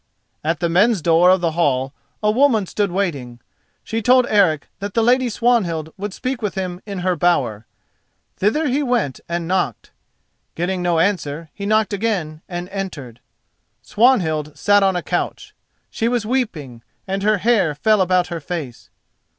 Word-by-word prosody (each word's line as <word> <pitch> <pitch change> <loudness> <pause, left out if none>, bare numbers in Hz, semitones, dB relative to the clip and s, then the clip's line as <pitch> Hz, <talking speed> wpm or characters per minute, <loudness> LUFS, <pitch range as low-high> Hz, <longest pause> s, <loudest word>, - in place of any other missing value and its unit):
At 160 +1 -1
the 170 - +2
men's 200 +6 +3
door 170 +2 +5
of 185 -1 +4
the 170 -2 +1
hall 135 -5 0 0.3
a 210 - +3
woman 235 -4 +3
stood 200 +1 -1
waiting. 145 -11 -3 0.4
She 225 +1 -3
told 250 +2 +4
Eric 185 -8 +2
that 200 0 -6
the 230 - +3
lady 250 +1 +3
Swanhild 190 -10 0
would 205 +1 -5
speak 255 +5 -4
with 210 -3 -3
him 185 -1 -4
in 200 -3 -5
her 185 -1 +2
bower. 130 -11 0 0.7
Thither 295 +11 +1
he 275 +3 +1
went 240 - -1
and 170 -1 -2
knocked. 185 +1 -2 0.6
Getting 180 +2 -2
no 175 -1 +1
answer 165 -4 -1
he 200 -1 -5
knocked 215 0 +2
again, 190 -8 -2
then 175 0 -5
entered. 160 - -6 0.6
Swanhild 165 - +1
sat 205 0 +4
on 190 -1 +2
a 175 - -2
couch. - - -3 0.4
She 225 - -1
was 240 -2 0
weeping, 165 - -3 0.3
and 195 +1 -2
her 215 +1 +2
hair 200 -8 +2
fell 215 +7 +2
about 185 -1 +2
her 170 - -3
face. 145 -6 -6
185 Hz, 165 wpm, -20 LUFS, 165-215 Hz, 0.7 s, door